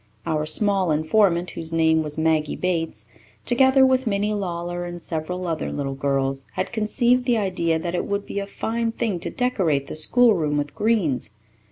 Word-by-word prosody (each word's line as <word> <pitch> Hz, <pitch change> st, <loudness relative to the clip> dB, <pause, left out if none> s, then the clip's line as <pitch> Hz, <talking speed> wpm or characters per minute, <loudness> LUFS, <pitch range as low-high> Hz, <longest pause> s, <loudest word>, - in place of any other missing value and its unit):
Our 155 Hz, -1 st, -1 dB
small 195 Hz, +1 st, +2 dB
informant, 170 Hz, +3 st, +2 dB
whose 165 Hz, 0 st, -7 dB
name 160 Hz, -1 st, +3 dB
was 150 Hz, -1 st, -5 dB
Maggie 160 Hz, -1 st, +1 dB
Bates, 165 Hz, -11 st, -2 dB, 0.4 s
together 265 Hz, +2 st, +5 dB
with 260 Hz, -1 st, +2 dB
Minnie 205 Hz, 0 st, 0 dB
Lawler 175 Hz, -3 st, -3 dB
and 175 Hz, 0 st, -6 dB
several 175 Hz, +2 st, -4 dB
other 165 Hz, -2 st, -2 dB
little 140 Hz, -1 st, -3 dB
girls, 135 Hz, -1 st, -1 dB
had -, -, -3 dB
conceived 240 Hz, +3 st, +1 dB
the 245 Hz, -2 st, +2 dB
idea 180 Hz, -5 st, 0 dB
that 170 Hz, +2 st, -4 dB
it 175 Hz, -, -1 dB
would 200 Hz, 0 st, -2 dB
be 200 Hz, -, -4 dB
a 200 Hz, -, -4 dB
fine 230 Hz, +3 st, -2 dB
thing 220 Hz, -7 st, -2 dB
to 170 Hz, -, -3 dB
decorate 180 Hz, -, 0 dB
the -, -, -7 dB
schoolroom 160 Hz, -3 st, +3 dB
with 145 Hz, 0 st, -2 dB
greens. 205 Hz, -, 0 dB
175 Hz, 175 wpm, -23 LUFS, 155-215 Hz, 0.4 s, together